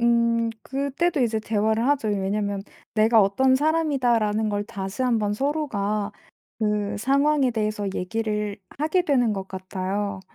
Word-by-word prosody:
음.그때도 235 +7 +1
이제 230 -3 +1
대화를 220 +2 +1
하죠. 280 -6 +1
왜냐하면 200 0 -1 0.3
'내가 220 +1 +5
어떤 260 +7 +3
사람이다.'라는 255 -8 +1
걸 205 0 -1
다시 200 +1 -5
한번 225 -5 +1
서로가 215 -6 -1 0.5
그 210 -1 0
상황에 275 +3 +2
대해서 215 -2 -2
얘기를 210 +1 -2 0.2
하게 315 +5 +2
되는 255 -9 +2
것 195 -1 -5
같아요. 190 +1 -3
220 Hz, 295 characters per minute, -24 LUFS, 205-260 Hz, 0.5 s, 내가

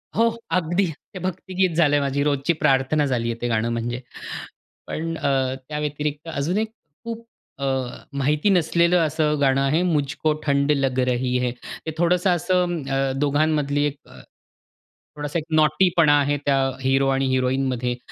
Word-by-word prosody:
हो, 230 +1 +4 0.3
अगदी 175 +3 +1 0.3
ते 185 - -6
भक्तिगीत 185 0 -1
झालं 150 -3 +4
आहे 145 - +3
माझी 140 +1 0
रोजची 145 +3 +1
प्रार्थना 145 0 +2
झाली 120 -4 -1
आहे 115 - -8
ते 120 - 0
गाणं 115 0 0
म्हणजे. 120 +2 -3 0.9
पण 165 +1 -3
अ, 130 -2 0
त्याव्यतिरिक्त 150 0 -3
अजून 155 +7 -1
एक 220 0 -1 0.3
खूप 230 0 -6 0.4
अ, 140 - 0 0.5
माहिती 145 +6 +1
नसलेलं 170 -1 +3
असं 150 -1 0
गाणं 135 -1 +3
आहे, 145 +5 +2
"मुझको 150 -2 0
ठंड 140 0 +2
लग 135 -3 +1
रही 125 0 0
है," 120 - 0 0.3
ते 160 - -2
थोडंसं 180 +2 +2
असं, 175 -1 +1
अ, 135 0 +1
दोघांमधली 145 0 +1
एक 145 -1 -2
अ, - - -14 1.0
थोडासा 150 +2 -3
एक 155 - -3 0.2
नॉटीपणा 155 -1 +4
आहे 145 +1 +1
त्या 140 -1 +3 0.2
हीरो 135 +1 +2
आणि 135 0 +1
हिरोईनमध्ये 130 -1 0
145 Hz, 150 wpm, -23 LUFS, 135-165 Hz, 1.0 s, हो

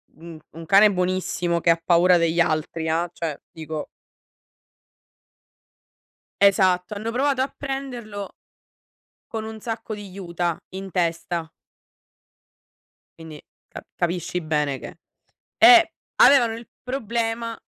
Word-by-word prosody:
Un 165 0 -11 0.2
un 165 +1 -9
cane 200 +5 +6
buonissimo 180 -2 -1
che - - +2
ha 165 0 +3
paura 175 +1 +5
degli 170 0 +2
altri, 160 0 -1
ehm, 165 +2 0
cioè 160 -5 -4
dico 160 -1 -6 2.6
Esatto, 185 -1 +3
hanno 220 +3 -4
provato 265 +2 +1
a 270 - -6
prenderlo 245 -7 -6 1.0
con 220 -1 -3
un 220 0 -8
sacco 225 -1 -5
di 205 -1 -9
juta 175 -3 -3 0.2
in 190 0 -7
testa. 170 -1 -2 1.7
Quindi 160 -2 -10 0.3
ca - - -10
capisci 175 0 -2
bene 150 -4 -1
che - - -10 0.6
eh, 340 -1 +8 0.2
avevano 240 -5 +6
il 230 +1 -10
problema 230 -2 -3
185 Hz, 110 wpm, -23 LUFS, 165-225 Hz, 2.6 s, eh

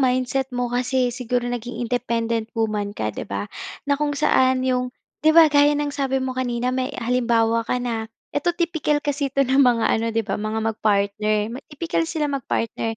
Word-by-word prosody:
mindset 255 +1 +1
mo 245 -1 -1
kasi 250 0 +1
siguro 245 0 -2
naging 245 0 -4
independent 230 -2 -1
woman 210 -2 -1
ka 110 -1 -2
'di - - -7
ba? 100 0 -3 0.4
Na 285 - +1
kung 290 -1 0
saan 260 -2 +3
yung 250 -1 +1 0.3
di 315 +1 +4
ba, 320 -3 +8
gaya 290 0 +5
ng 290 -1 -1
sabi 270 -1 -1
mo 260 -1 -1
kanina 250 -1 -1
may 255 0 -1
halimbawa 230 -2 +2
ka 240 +2 -1
na 230 -3 -3 0.2
ito 290 +4 0
tipikal 320 -4 0
kasi 285 -1 0
ito 275 +1 +1
ng 270 +2 +3
mga 240 -4 +4
ano 225 - +2
di 225 -1 -1
ba, - - -3
mga 220 +1 -2
mag-partner. 215 +1 0
Tipikal 330 +2 -2
sila 315 -3 -1
mag 280 -2 -1
partner 225 0 -1
250 Hz, 185 wpm, -22 LUFS, 225-275 Hz, 0.4 s, ba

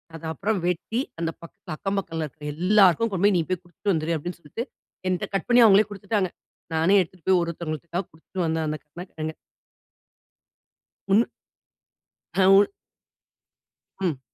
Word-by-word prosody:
அது 165 - -9
அப்புறம் 200 +4 -1
வெட்டி 220 +8 -1 0.2
அந்த 165 0 0
பக்கத் 165 - -9
"அக்கம் 195 0 -2
பக்கத்தில 165 -4 -3
இருக்கிற 150 +2 -13
எல்லாருக்கும் 200 +4 +4
கொண்டு 190 +1 +1
போயி, 205 -2 +5
நீ 165 - +2
போய் 185 -1 -1
கொடுத்துட்டு 175 +3 -2
வந்துரு" 160 +1 0
அப்படீன்னு 175 +3 -6
சொல்ட்டு, 195 - -5 0.4
என்ட்ட 180 - 0
கட் - - -1
பண்ணி 240 0 +7
அவங்களே 205 0 +6
கொடுத்துட்டாங்க. 200 -1 -1 0.5
நானே 165 +6 +4
எடுத்துட்டு 180 0 -8
போய் 185 -1 +5
ஒரு 170 - -2
ஒருதவங்களுக்க 170 +2 -4
கொடுத்துட்டு 165 +4 -10
வந்தேன் 160 0 0
அந்த 155 - -2
கருணகிழங்க. 160 0 -7 1.8
உன் 215 - +7 1.2
அ 190 - +6
உன் 200 +1 +7 1.3
ம். 165 -9 -1
180 Hz, 145 wpm, -25 LUFS, 160-195 Hz, 1.8 s, பண்ணி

